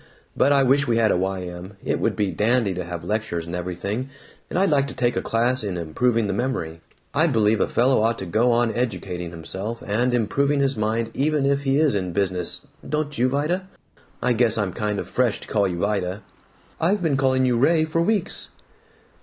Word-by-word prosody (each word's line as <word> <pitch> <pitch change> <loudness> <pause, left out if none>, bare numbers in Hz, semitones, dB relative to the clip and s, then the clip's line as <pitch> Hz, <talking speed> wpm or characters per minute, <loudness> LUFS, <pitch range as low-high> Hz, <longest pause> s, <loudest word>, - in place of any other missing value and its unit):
But 140 - +3
I 140 -1 +5
wish 140 +2 +3
we 115 -1 +2
had 110 -2 +3
a - - +2
Y. 95 0 -2
M. 90 +2 -8
It - - 0
would - - 0
be 100 -3 0
dandy 110 +2 +1
to 90 0 -4
have 85 -1 -6
lectures 90 -4 -2
and 85 +1 -5
everything, 90 +8 -3 0.4
and - - -3
I'd 195 -2 +3
like 140 -1 +3
to 140 - -8
take 120 -1 +1
a - - 0
class 120 +2 0
in 95 -4 -3
improving 110 +8 0
the 100 - -1
memory 95 -9 -3 0.3
I 155 +4 +3
believe 110 -6 +2
a - - +2
fellow 125 -1 +3
ought 115 +1 +1
to 95 - -5
go 110 +8 +2
on 120 -1 +2
educating 95 -8 -3
himself 95 +7 -6
and 120 +5 +1
improving 140 +5 +1
his 135 -1 +1
mind 110 +1 -1
even 150 0 +1
if 140 0 +1
he 135 +1 +2
is 150 -4 +3
in 90 -3 -1
business, 90 -2 0 0.3
don't 150 0 -1
you, 125 +2 +2
Vida 160 +8 -1 0.6
I 125 - +3
guess 115 -1 +2
I'm 100 -4 -1
kind 105 -2 -2
of - - -4
fresh 125 -4 +1
to - - -10
call 100 -2 +1
you 90 -2 -3
'Vida'!" 100 -1 -1 0.6
"I've 185 +4 +1
been 155 -4 +2
calling 130 -1 +2
you 125 -2 +2
'Ray' 155 +4 +4
for 160 +1 0
weeks!" 205 +1 +1
115 Hz, 210 wpm, -23 LUFS, 95-135 Hz, 0.6 s, I